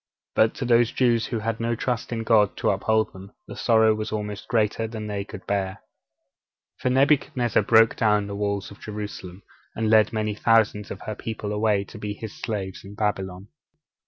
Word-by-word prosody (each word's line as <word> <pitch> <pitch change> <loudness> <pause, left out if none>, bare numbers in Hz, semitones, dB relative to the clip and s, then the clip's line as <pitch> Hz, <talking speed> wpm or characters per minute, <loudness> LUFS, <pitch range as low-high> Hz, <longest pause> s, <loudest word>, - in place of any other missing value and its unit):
But 110 0 +3
to 135 - -4
those 120 0 +4
Jews 120 -3 +2
who 120 - -2
had 115 +1 -2
no 115 0 0
trust 120 +1 -2
in 115 -1 -2
God 110 -3 +3
to - - +2
uphold 110 +3 +1
them, 95 +1 -12
the - - -9
sorrow 110 -2 +4
was 110 0 -4
almost 105 0 -4
greater 110 -1 +1
than 110 -1 -6
they 100 -1 -3
could 100 -1 -10
bear. 95 -2 -1 1.0
For 130 - 0
Nebuchadnezzar 130 -4 +2
broke 110 +2 +4
down 105 -2 +2
the 100 - -6
wall 100 -1 -1
of 100 - -13
Jerusalem, 105 -3 -7 0.3
and 110 -1 0
led 110 -1 +5
many 110 -1 -1
thousands 105 -2 +2
of - - -7
her 110 - -4
people 105 -1 -5
away 105 -1 +1
to 105 +2 -12
be 105 -1 -4
his 110 0 -7
slaves 100 -5 -5
in 100 +1 -11
Babylon. 95 -2 -3
110 Hz, 190 wpm, -24 LUFS, 100-115 Hz, 1.0 s, led